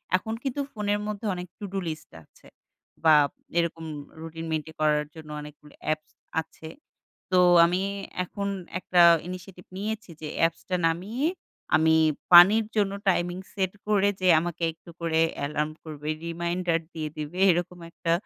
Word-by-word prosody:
এখন 220 +4 -2
কিন্তু 270 +1 -2
ফোনের 205 -1 0
মধ্যে 210 +1 -5
অনেক 180 0 -6
to 205 - -5
do - - -1
list 155 -1 -6
আছে। - - -22 0.6
বা, 160 -1 +7 0.4
এরকম 170 -1 0 0.4
রুটিন 165 0 -7
মেইনটেইন 160 0 -3
করার 150 -1 +3
জন্য 160 -1 -11
অনেকগুলো 150 0 -13
অ্যাপস 155 0 -2 0.3
আছে। 160 0 -13 0.6
তো, 185 - +4 0.3
আমি 175 +2 +1 0.4
এখন 200 +2 -4 0.3
একটা 180 -1 +3 0.3
initiative 180 0 -9
নিয়েছি 215 0 -4
যে, 155 - -4
অ্যাপসটা 165 +2 0
নামিয়ে 205 - -1 0.5
আমি 160 0 +4 0.4
পানির 200 +6 +9
জন্য 205 -2 +2 0.2
টাইমিং 175 0 0 0.2
সেট 190 -2 -1
করে 205 -1 +3
যে 185 - +2
আমাকে 170 +1 -4
একটু 165 - -18
করে 165 -1 +1 0.2
অ্যালার্ম 150 +2 -2
করবে, 150 -2 -8 0.2
রিমাইন্ডার 170 0 -1
দিয়ে 155 -2 -4
দিবে, 155 +4 -5
এরকম 175 +1 -2
একটা 165 0 -2
175 Hz, 145 wpm, -26 LUFS, 160-190 Hz, 0.6 s, পানির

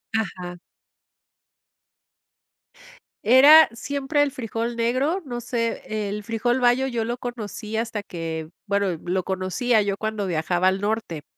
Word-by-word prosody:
Ajá. 180 -5 -3 2.7
Era 280 +8 +8
siempre 280 +4 -1
el 290 -1 +2
frijol 230 -1 -4
negro, 255 +10 0
no 240 -3 -5
sé, 230 -1 -2 0.3
el 210 +1 -4
frijol 240 +3 0
bayo 245 +1 +3
yo 240 -4 -1
lo 240 +2 -3
conocí 220 -3 -6
hasta 225 -2 -2
que, 165 -4 -5 0.2
bueno, 200 0 +1
lo 180 +1 -1
conocía 195 +5 +1
yo 200 -1 -1
cuando 215 -2 -3
viajaba 175 +2 +1
al 190 +1 +1
norte. 205 -8 -2
225 Hz, 125 wpm, -24 LUFS, 195-245 Hz, 2.7 s, Era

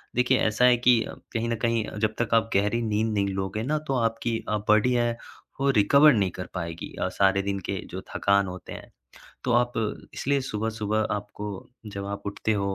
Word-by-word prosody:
देखिए 125 +1 +3
ऐसा 110 +3 +3
है 125 -1 +6
कि 120 -1 +4
अ, - - -8 0.2
कहीं 115 +1 -1
न 115 - 0
कहीं 115 0 +1
अ, - - -8
जब 110 0 0
तक 120 - -1
आप 115 0 +2
गहरी 105 +4 +2
नींद 110 0 0
नहीं 100 -1 +1
लोगे 95 +3 -2
ना 150 +5 0
तो 135 - 0
आपकी 115 0 0
अ, 105 - +1
बॉडी 110 +4 +4
है, 120 -1 +1 0.4
वो 140 0 +2
रिकवर 140 +7 +6
नहीं 100 -4 +1
कर 90 +1 -7
पाएगी 85 -2 -5
अ, - - +1
सारे 100 0 +2
दिन 100 0 -2
के - - -1
जो - - -5
थकान 100 -1 +3
होते 90 0 -8
हैं। - - -11 0.5
तो 125 - +1
आप 120 +1 +3 0.4
इसलिए 140 +1 0
सुबह-सुबह 110 -2 -1
आपको 105 0 -6 0.4
जब 100 -1 -6
आप 100 0 -5
उठते 100 +2 -1
हो 100 -2 -1
110 Hz, 205 wpm, -26 LUFS, 100-120 Hz, 0.5 s, है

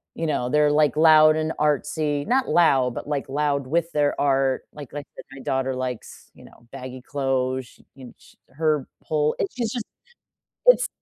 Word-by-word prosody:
you 165 - -3
know, 140 -5 -1
they're, 150 +1 +3
like, 150 -2 +3
loud 155 -1 +6
and 155 0 -1
artsy. 150 0 0
Not 260 +1 +1
loud, 135 -7 +3
but, - - -6
like, 145 -2 -3
loud 140 -1 -1
with 165 +4 0
their 145 -2 0
art. 135 -2 +1
Like 145 -4 -11
like 145 -1 -6 0.3
my 135 - -10
daughter 130 0 -1
likes, 130 -2 -6
you - - -16
know, 120 - -19
baggy 130 -1 -8
clothes. 130 -1 -2
Sh - - -21 0.2
and 130 -2 -12
sh - - -21
her 150 -1 -1 0.2
pull 150 -1 0
it's 195 - -2
she's 235 -3 -2
just 240 -3 -4 0.8
it's - - +6
145 Hz, 180 wpm, -23 LUFS, 130-155 Hz, 0.8 s, loud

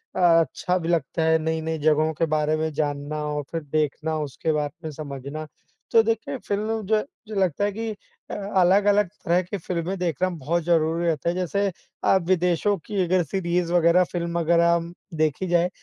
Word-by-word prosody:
अ, - - -2
अच्छा 175 +1 +3
भी 165 -2 -4
लगता 165 -1 0
है, 160 0 +4
नई-नई 160 0 -2
जगहों 155 +1 +2
के 165 - 0
बारे 150 0 +1
में 160 0 -1
जानना 145 0 -2
और 150 -1 -2
फिर 165 -1 -2
देखना, 155 +1 -1
उसके 150 +2 -2
बात 150 -1 -1
में 155 - -4
समझना। 145 +1 -6 0.4
तो 225 - +7
देखिए, 225 +3 -1
फ़िल्म 215 +1 -2
जो 215 +1 +2 0.3
जो 215 - -6
लगता 185 0 +1
है 205 - 0
कि 225 +2 -4 0.4
अ, - - -4
अलग-अलग 200 0 +3 0.2
तरह 175 +2 +3
की 185 +3 -5
फ़िल्में 180 +2 -3
देखना 180 +1 0
बहुत 170 0 -2
ज़रूरी 165 0 +2
रहता 165 0 0
है। 175 - -1
जैसे 190 +3 0 0.4
अ, - - +4
विदेशों 180 +2 +2
की 200 -3 0
अगर 180 0 +2
सीरीज़ 175 +1 -1
वगैरह, 175 +1 +5
फ़िल्म 170 -1 -3
वगैरह 170 +1 +4
अम, 170 0 -3 0.2
देखी 155 +3 0
जाए, 175 +1 +2
170 Hz, 180 wpm, -24 LUFS, 155-185 Hz, 0.4 s, तो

